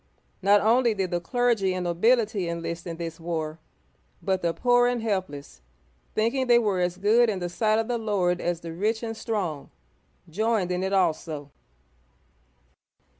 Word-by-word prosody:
Not 200 +2 +5
only 235 +1 +3
did 190 -2 -2
the 175 0 -1
clergy 225 -2 +1
and 185 - -2
nobility 205 +2 +1
enlist 170 +1 -5
in 165 -1 -5
this 165 -1 -6
war, 160 -1 -4 0.6
but 190 -2 -1
the 170 - +1
poor 245 +5 +3
and 245 -2 -1
helpless, 145 - -4 0.5
think 225 +3 +1
ing 260 -1 -1
they 240 -1 +6
were 210 -5 +1
as 180 0 -1
good 220 +5 +4
in 205 - -1
the 175 -1 -3
sight 215 +5 +1
of 225 0 0
the 240 -1 -1
Lord 185 -5 0
as 175 -1 -2
the 165 -1 -7
rich 215 +6 -1
and 225 -1 -4
strong, 180 - -3 0.6
joined 205 +1 0
in 180 0 -1
it 190 +1 -1
also. 160 -6 -1
190 Hz, 170 wpm, -26 LUFS, 170-225 Hz, 0.6 s, they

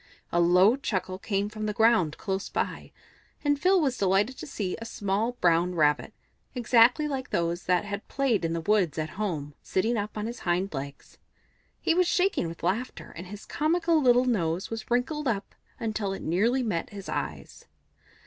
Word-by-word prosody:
A 175 - +2
low 180 +6 +5
chuckle 190 -8 -3
came 200 0 -1
from 215 0 -5
the 210 - -1
ground 220 -9 +3
close 195 -1 -3
by, - - -3 0.5
and 290 -1 +2
Phil 370 +4 +4
was 270 -6 0
delighted 200 +6 +2
to - - -7
see 200 -9 -3
a - - -3
small 215 +1 -1
brown 175 -4 +2
Rabbit, 150 -2 +2 0.4
exactly 245 +4 +4
like 270 -3 -4
those 170 +1 -1
that 180 +2 +2
had 205 0 -5
played 265 -8 0
in 165 0 0
the 165 - -2
woods 185 -4 +1
at 155 -1 -2
home, 150 -8 -3
sitting 225 +5 0
up 210 +1 -4
on 210 - -2
his 235 +1 -5
hind 180 +2 -1
legs. 140 0 -7 0.6
He - - +2
was 360 +1 +3
shaking 360 - +1
with 165 0 -9
laughter, 205 +9 -2
and 175 +2 -8
his 205 +2 -9
comical 330 +1 +1
little 250 -1 +5
nose 185 -6 0
was 225 -1 -5
wrinkled 270 +5 0
up 205 -4 -2 0.3
until 215 -3 -2
it - - -7
nearly 230 +10 +1
met 185 -8 -2
his 200 -2 -9
eyes. - - -5
210 Hz, 180 wpm, -27 LUFS, 180-245 Hz, 0.6 s, low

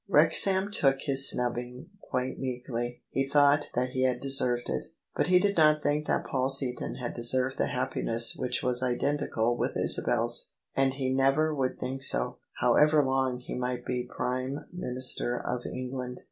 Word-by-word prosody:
Wrexham 195 +1 +4
took 135 -8 +1
his 135 -1 +5
snubbing 125 +3 -3
quite 125 +1 -4
meekly: 125 -2 -5
he 135 0 -1
thought 145 +1 +3
that 125 +1 -1
he 130 - -2
had 130 -1 +1
deserved 125 -3 +2
it. 65 -1 -2 0.3
But - - 0
he 180 0 +5
did 200 +2 +1
not 155 -2 +4
think 150 +1 0
that - - 0
Paul 130 0 -1
Seaton 135 -3 0
had 125 -2 -5
deserved 125 +2 0
the - - +1
happiness 115 0 0
which 125 -2 -3
was 125 0 +1
identical 125 -2 -1
with - - -2
Isabel's; - - 0 0.2
and 135 -1 +1
he 130 -2 -2
never 135 +4 +2
would 130 -3 -2
think 130 +1 -5
so, - - +2 0.2
however 150 0 +3
long 130 -1 0
he - - -8
might 125 -1 -4
be 125 -1 -3
Prime 130 +2 -3
Minister 125 -6 -1
of 125 0 -4
England. 125 0 -6
130 Hz, 165 wpm, -28 LUFS, 125-140 Hz, 0.3 s, his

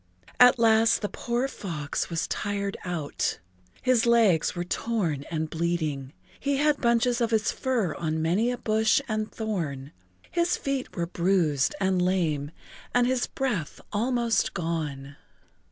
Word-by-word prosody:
At 250 0 +8
last 225 -1 +4
the 205 - -1
poor 240 +2 -1
fox 165 - -4
was 165 -2 -1
tired 200 -1 -2
out. 170 -5 -2 0.5
His 250 -2 +3
legs 220 -10 +4
were 175 - -2
torn 175 -7 -2
and 160 -1 -2
bleeding, 155 -5 -2 0.3
he 280 0 0
had 295 0 +3
left - - -18
bunches 235 +1 +2
of 230 - +2
his 220 -2 +1
fur 235 - -1
on 160 +1 -2
many 180 +9 +1
a 245 - -2
bush 220 +1 +2
and 215 -1 -2
thorn, 160 -11 -4 0.4
his 340 0 +1
feet 275 -2 -3
were 170 -3 -1
bruised 170 -5 +1
and 190 -2 +1
lame 165 -6 0 0.5
and 245 0 +5
his 255 0 +1
breath 210 - -3
almost 235 +1 +1
gone. 150 -5 -3
200 Hz, 145 wpm, -27 LUFS, 160-235 Hz, 0.5 s, At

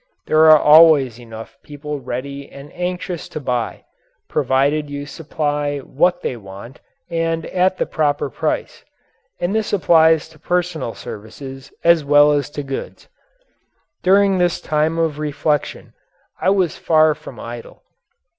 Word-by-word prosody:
There 155 +1 +5
are 155 - +9
always 150 -6 +6
enough 115 +2 -11
people 150 0 -7
ready 140 +2 -6
and 140 +1 -13
anxious 180 -1 -4
to - - -6
buy, 125 -4 -3 0.4
provided 145 +3 0
you 145 0 -5
supply 145 -1 -3
what 145 +6 0
they - - -2
want 100 +4 -11 0.3
and 165 -1 -1
at 185 +1 +1
the - - 0
proper 145 -3 -1
price - - -3 0.6
and 175 +3 -1
this 220 -1 -1
applies 160 -5 +4
to - - -19
personal 175 -9 -2
services 135 +6 -10
as 170 -2 +4
well 145 +1 +5
as 145 -1 0
to 145 -1 -6
goods. 135 -1 -7 0.9
During 195 0 +3
this 175 -1 +1
time 155 +2 0
of 160 -3 -1
reflection 150 0 -2 0.5
I 185 - +2
was 190 -4 +1
far 155 -1 +4
from 150 -6 -12
idle. 120 0 -9
150 Hz, 135 wpm, -19 LUFS, 140-165 Hz, 0.9 s, are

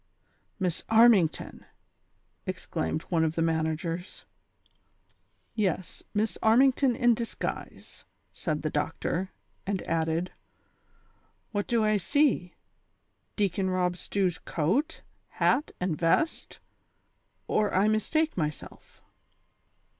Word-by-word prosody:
'' - - -41
" - - -44
Miss 180 -2 -1
Armington! 220 -7 +4 0.4
" - - -44
exclaimed 80 - -3
one 165 -3 +2
of 160 0 0
the 165 - 0
managers. 165 +2 -2 1.3
"Yes, 190 -5 -2
Miss 215 +2 -1
Armington 255 +3 +4
in 240 -1 +4
disguise," 230 0 -6 0.3
said 155 -2 -3
the 155 - -1
doctor; 165 +4 -2 0.4
and 195 -2 -1
added: 165 +2 -1 1.2
"What 205 -2 -2
do 230 -2 +2
I 215 0 +3
see? 230 - +1 0.8
Deacon 195 -2 0
Eob 180 -1 0
Stew's 180 -1 -1
coat, 220 - -1 0.3
hat 295 - +2
and 180 -3 -1
vest, 175 - 0 0.9
or 210 -1 +1
I 195 +3 +3
mistake 310 +9 +1
myself." 150 -3 -6
185 Hz, 105 wpm, -28 LUFS, 165-220 Hz, 1.3 s, Armington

